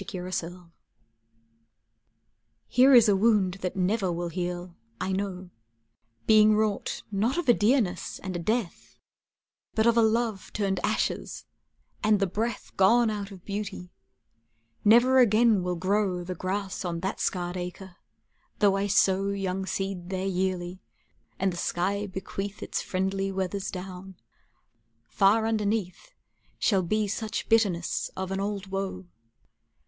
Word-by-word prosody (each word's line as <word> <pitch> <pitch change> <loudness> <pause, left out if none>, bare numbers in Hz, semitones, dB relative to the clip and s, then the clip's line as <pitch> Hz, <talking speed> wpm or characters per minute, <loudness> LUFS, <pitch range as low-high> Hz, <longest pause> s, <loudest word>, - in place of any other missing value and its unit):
[Pg 205 +1 -7
196] 180 0 -5
IV 170 - -25 2.0
Here 260 +2 +6
is 235 -2 +7
a 205 - +4
wound 195 -3 +2
that 180 - -3
never 190 0 +1
will 170 0 -3
heal, 175 0 -4 0.2
I 190 - -2
know, 190 -2 -4 0.7
Being 215 0 +6
wrought 215 -1 -1
not 220 - 0
of 350 -5 -2
a 240 - +7
dearness 220 -3 +1
and 190 -2 -6
a - - -2
death 215 +2 -3 0.8
But 220 - +2
of 235 -1 +4
a - - +6
love 220 -2 0
turned 195 -3 -1
ashes - - -2 0.6
and 210 -1 +4
the 195 - +2
breath 215 +4 -3
Gone 225 +4 +4
out 205 -2 -4
of 190 -3 -13
beauty; 200 -3 -5 0.9
never 240 +5 +6
again 225 -3 +4
will 180 0 -2
grow 185 0 0
The 185 +1 -4
grass 190 +2 -3
on 170 -2 -3
that 190 +2 -3
scarred 175 -1 -2
acre, 180 0 -7 0.6
though 200 -2 +4
I 200 +1 0
sow 195 0 +3
Young 190 -1 -2
seed 190 -3 -3
there 190 0 -2
yearly 185 -1 -2 0.6
and 190 -1 0
the - - -7
sky 200 +5 -1
bequeath 195 +1 -6
Its - - -2
friendly 195 +1 -1
weathers 190 +1 -3
down, 185 0 -8 0.9
far 200 - +3
underneath 220 - -2 0.4
Shall 195 -4 +2
be 210 +4 0
such 220 +2 -3
bitterness 200 -7 +1
of 190 0 -3
an 195 - -2
old 200 0 -3
woe. 195 - -4
195 Hz, 140 wpm, -27 LUFS, 185-215 Hz, 2.0 s, is